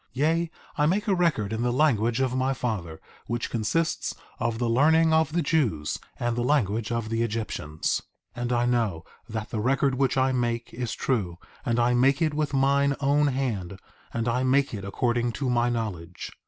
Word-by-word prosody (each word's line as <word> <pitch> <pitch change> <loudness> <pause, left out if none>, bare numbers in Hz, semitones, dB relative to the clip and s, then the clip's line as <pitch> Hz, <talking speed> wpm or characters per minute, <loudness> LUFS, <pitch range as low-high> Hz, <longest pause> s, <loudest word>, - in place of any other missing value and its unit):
1:2 - - -38
Yea, 160 +5 +1 0.3
I 150 - +4
make 205 +6 +1
a 200 - +3
record 155 - +1
in 110 - -2
the 120 0 +1
language 120 -3 +2
of 130 -1 0
my 130 +1 +1
father, 100 -11 -3 0.3
which 120 0 -2
consists 160 +9 -1 0.2
of 115 -1 -1
the 120 0 0
learning 160 +7 +4
of 160 0 +3
the 175 - +1
Jews 120 - 0 0.2
and 120 -1 0
the 120 - -1
language 115 -5 +1
of 115 -2 -2
the 115 0 0
Egyptians. 105 -9 -2 0.3
1:3 120 - -6
And 120 0 -1
I 120 0 +2
know 115 -9 0 0.3
that 110 -1 -5
the 110 - -2
record 135 +4 +2
which 135 +1 +1
I 130 0 +3
make 120 -2 -1
is 120 -1 -3
true; 95 -10 -1 0.3
and 120 -4 0
I 120 +1 +3
make 135 +3 +3
it 155 -2 +1
with 150 -1 -1
mine 140 +1 +3
own 145 +1 +3
hand; 110 -9 -2 0.3
and 115 0 -2
I 120 +2 +1
make 135 +1 +2
it 100 -2 -5
according 120 +4 0
to 135 -1 -1
my 120 0 +2
knowledge. 95 -8 -4
120 Hz, 195 wpm, -26 LUFS, 115-140 Hz, 0.3 s, I